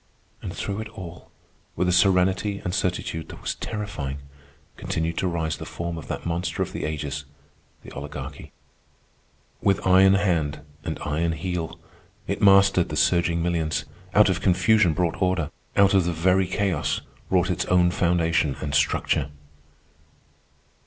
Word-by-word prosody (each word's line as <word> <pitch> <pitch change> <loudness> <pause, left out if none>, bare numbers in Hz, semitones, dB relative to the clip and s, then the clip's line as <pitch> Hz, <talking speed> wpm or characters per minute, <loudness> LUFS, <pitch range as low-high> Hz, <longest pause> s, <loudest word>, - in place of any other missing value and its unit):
And - - -5
through 100 +1 -4
it 110 - -7
all, 85 -3 -9 0.5
with 90 +2 0
a - - +3
serenity 95 +2 +3
and 90 - -2
certitude 90 -3 -2
that - - -9
was - - -3
terrifying, 90 -11 -5 0.6
continued 80 0 -2
to 95 - 0
rise 80 -3 -2
the - - -7
form 85 0 -4
of 80 - -8
that - - -5
monster 85 +1 -1
of - - -8
the - - -3
ages, 75 -2 -4 0.6
the - - -11
Oligarchy. 70 0 -8 1.1
With 100 -1 +1
iron 95 +1 +6
hand 85 -7 0 0.2
and - - -3
iron 80 +3 0
heel 85 0 -4 0.5
it - - -3
mastered 100 -3 +5
the - - -4
surging 85 -1 +2
millions, 85 -3 -1 0.3
out 105 0 +7
of 95 0 0
confusion 95 0 +4
brought 90 +1 -1
order, 90 -5 +1 0.3
out 100 -1 +5
of 95 -3 +4
the 85 - 0
very 90 +3 +2
chaos 95 -4 -1 0.3
wrought 90 -1 +2
its 90 - -1
own 90 -1 +3
foundation 85 -5 +1
and 70 -2 -4
structure. 70 -1 +1
90 Hz, 150 wpm, -24 LUFS, 80-95 Hz, 1.1 s, out